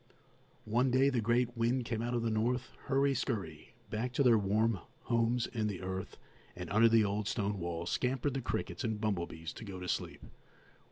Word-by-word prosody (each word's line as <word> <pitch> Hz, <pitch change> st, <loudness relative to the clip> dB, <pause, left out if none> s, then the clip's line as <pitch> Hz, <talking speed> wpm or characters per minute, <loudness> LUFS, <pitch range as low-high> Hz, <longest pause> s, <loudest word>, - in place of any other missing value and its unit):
One 120 Hz, +4 st, +2 dB
day 130 Hz, +2 st, +4 dB
the 125 Hz, -3 st, +1 dB
great 120 Hz, +2 st, +1 dB
wind 120 Hz, +2 st, +1 dB
came 115 Hz, -1 st, -2 dB
out 120 Hz, +1 st, -1 dB
of 120 Hz, -, 0 dB
the 115 Hz, -, 0 dB
north. 120 Hz, +3 st, 0 dB, 0.2 s
Hurry 140 Hz, +1 st, +3 dB
scurry! 95 Hz, -, -3 dB, 0.2 s
back 115 Hz, +4 st, -1 dB
to 140 Hz, -, +3 dB
their 120 Hz, -3 st, +6 dB
warm 105 Hz, +1 st, +2 dB, 0.2 s
homes 115 Hz, 0 st, +1 dB
in 110 Hz, -3 st, -2 dB
the 95 Hz, -3 st, -4 dB
earth 95 Hz, 0 st, -4 dB, 0.4 s
and -, -, -6 dB
under 115 Hz, +3 st, +6 dB
the 115 Hz, -1 st, +5 dB
old 100 Hz, +1 st, -1 dB
stone 105 Hz, -3 st, -1 dB
wall 85 Hz, -1 st, -3 dB
scampered 130 Hz, +2 st, 0 dB
the 135 Hz, -, -2 dB
crickets 90 Hz, -6 st, -3 dB
and 110 Hz, -2 st, -1 dB
bumblebees 85 Hz, -6 st, -2 dB
to -, -, -9 dB
go 100 Hz, -3 st, -7 dB
to 90 Hz, -, -6 dB
sleep. -, -, -3 dB
115 Hz, 190 wpm, -33 LUFS, 100-125 Hz, 0.4 s, their